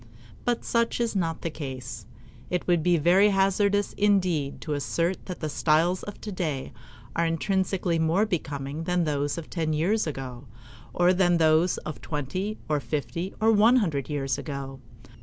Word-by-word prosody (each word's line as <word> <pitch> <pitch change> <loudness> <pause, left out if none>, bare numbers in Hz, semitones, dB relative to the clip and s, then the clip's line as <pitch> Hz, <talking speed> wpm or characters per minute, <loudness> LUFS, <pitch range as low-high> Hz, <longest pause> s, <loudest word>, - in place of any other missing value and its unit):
But 240 -1 0
such 235 0 +1
is 235 -3 0
not 165 -4 -1
the 165 - -2
case. 130 -8 -7 0.4
It 180 -1 -1
would 175 -2 +3
be 175 +1 +3
very 180 +6 +5
hazardous 200 +1 +2
indeed 185 -9 +1
to 155 - -3
assert 170 +5 -1
that 180 - -6
the 155 - -1
styles 165 +4 +2
of 205 - -8
today 170 -10 -4 0.4
are 170 - +2
intrinsically 185 0 0
more 165 +6 +3
becoming 145 -5 -3
than 180 0 +1
those 145 -1 -1
of 165 - -6
ten 160 -3 -1
years 180 +7 +1
ago, 130 -3 -6 0.4
or 175 +1 +3
than 175 -2 +3
those 160 +2 +3
of 155 - -6
twenty, 185 +9 -3
or 150 -1 +1
fifty, 165 +6 -4
or 220 +1 +4
one 225 +3 +5
hundred 160 - 0
years 135 -4 -1
ago. 135 -2 -6
170 Hz, 160 wpm, -26 LUFS, 150-190 Hz, 0.4 s, very